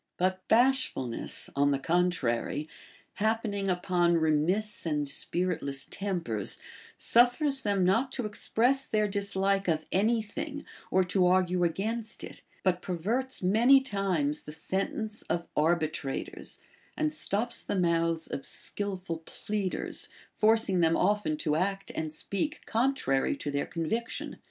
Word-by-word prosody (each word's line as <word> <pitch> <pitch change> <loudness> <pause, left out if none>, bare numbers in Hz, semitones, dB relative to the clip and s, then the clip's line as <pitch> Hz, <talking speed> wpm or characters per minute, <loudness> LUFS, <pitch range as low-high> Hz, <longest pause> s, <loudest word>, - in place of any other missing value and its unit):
But 185 +1 -1
bash 255 +3 +4
fidness, 125 -3 0
on 140 +1 +3
the 140 - +2
contrary, 150 -3 0 0.5
happening 215 -2 0
upon 175 -1 +2
remiss 165 +7 +2
and 150 -3 -1
spirit 175 +4 0
less 140 -1 -1
tempers, 170 - -1 0.4
suffers 265 +4 +4
them 200 -4 +1
not 225 +9 +2
to 250 - -2
express 245 +5 +1
their 215 -1 +1
dislike 200 -1 0
of 155 -2 0
any 220 +4 +2
thing 290 +8 -6 0.2
or 190 - +3
to 180 0 +2
argue 180 -1 +2
against 215 +6 -1
it, - - -9 0.2
but 180 -2 +1
perverts 215 +9 -2
many 235 +9 +6
times 195 - -1
the 150 - -9
sentence 195 +6 -3
of 170 0 -1
arbitrators, 155 -3 -1 0.4
and 155 0 0
stops 205 +10 0
the - - -2
mouths 165 -2 +1
of 135 - -5
skilful 190 -3 -2
pleaders, 195 +3 -2 0.3
forcing 220 -3 +3
them 165 -1 +3
often 200 -5 +1
to 150 0 0
act 195 +4 -1
and 155 -1 -3
speak 200 - -3
coiitrary 235 - +1
to 145 - -4
their 140 0 -1
conviction. 175 +8 -3
185 Hz, 130 wpm, -29 LUFS, 160-215 Hz, 0.5 s, many